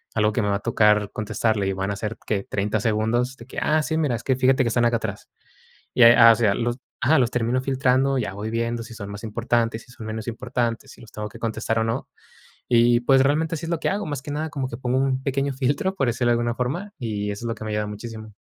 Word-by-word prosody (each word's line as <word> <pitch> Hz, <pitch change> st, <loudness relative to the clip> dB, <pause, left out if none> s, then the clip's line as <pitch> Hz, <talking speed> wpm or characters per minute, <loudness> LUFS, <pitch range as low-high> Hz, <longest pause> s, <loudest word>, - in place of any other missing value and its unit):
Algo 105 Hz, -1 st, +3 dB
que 120 Hz, -, +1 dB
me 105 Hz, -, 0 dB
va 100 Hz, -, +1 dB
a -, -, -9 dB
tocar 105 Hz, -2 st, +3 dB
contestarle 110 Hz, -1 st, -1 dB
y 95 Hz, -, 0 dB
van 95 Hz, +1 st, -2 dB
a -, -, -2 dB
ser, 110 Hz, +2 st, -4 dB
¿qué?, 100 Hz, -2 st, -1 dB
30 105 Hz, +2 st, 0 dB
segundos 110 Hz, +4 st, 0 dB
de 115 Hz, -, -12 dB
que: -, -, -5 dB
"Ah, 155 Hz, 0 st, +2 dB
sí, 160 Hz, +1 st, -1 dB
mira, 150 Hz, -6 st, +1 dB
es 115 Hz, -, -7 dB
que 130 Hz, -, +1 dB
fíjate 130 Hz, +1 st, +3 dB
que 120 Hz, -, 0 dB
están 120 Hz, +1 st, +2 dB
acá 120 Hz, 0 st, +3 dB
atrás." 105 Hz, -3 st, -6 dB, 0.6 s
Y, 125 Hz, -, +5 dB
eh, 115 Hz, 0 st, +9 dB
a 115 Hz, -1 st, +9 dB
o -, -, 0 dB
sea, 110 Hz, -3 st, +2 dB
los 120 Hz, 0 st, -1 dB, 0.2 s
Ajá, 155 Hz, +4 st, +4 dB
los 125 Hz, -3 st, +2 dB
termino 125 Hz, +1 st, 0 dB
filtrando, 135 Hz, 0 st, +2 dB
ya 105 Hz, -5 st, -3 dB
voy 105 Hz, +3 st, -5 dB
viendo 115 Hz, 0 st, -1 dB
si 115 Hz, -, -11 dB
son 100 Hz, -2 st, -7 dB
más 105 Hz, +1 st, -8 dB
importantes, 115 Hz, 0 st, -1 dB
si 125 Hz, -, -19 dB
son 115 Hz, -3 st, -9 dB
menos 110 Hz, +1 st, -5 dB
importantes, 120 Hz, 0 st, -2 dB
si -, -, -18 dB
los 110 Hz, -, -14 dB
tengo 105 Hz, 0 st, -5 dB
que -, -, -12 dB
contestar 115 Hz, 0 st, -2 dB
o -, -, +2 dB
no. 115 Hz, -, -3 dB, 0.6 s
Y 120 Hz, 0 st, +4 dB
pues, 135 Hz, +2 st, +4 dB
realmente 150 Hz, +4 st, +1 dB
así 165 Hz, -, -5 dB
es -, -, -3 dB
lo 170 Hz, -, 0 dB
que -, -, -1 dB
hago, 205 Hz, +1 st, -2 dB
más 145 Hz, -3 st, -4 dB
que 145 Hz, -, -6 dB
nada 155 Hz, +2 st, -2 dB
como 135 Hz, -3 st, -3 dB
que 115 Hz, -, -6 dB
pongo 125 Hz, 0 st, -1 dB
un 135 Hz, -1 st, 0 dB
pequeño 135 Hz, 0 st, -1 dB
filtro, 140 Hz, +8 st, 0 dB
por 135 Hz, -8 st, 0 dB
decirlo 120 Hz, +1 st, +1 dB
de -, -, +5 dB
alguna 120 Hz, 0 st, 0 dB
forma, 145 Hz, -, -3 dB
y 105 Hz, -3 st, -3 dB
eso 100 Hz, +3 st, -6 dB
es -, -, -1 dB
lo -, -, 0 dB
que 110 Hz, -, -8 dB
me -, -, -4 dB
ha -, -, -2 dB
ayudado -, -, -6 dB
muchísimo. 110 Hz, 0 st, -8 dB
120 Hz, 275 wpm, -23 LUFS, 110-130 Hz, 0.6 s, eh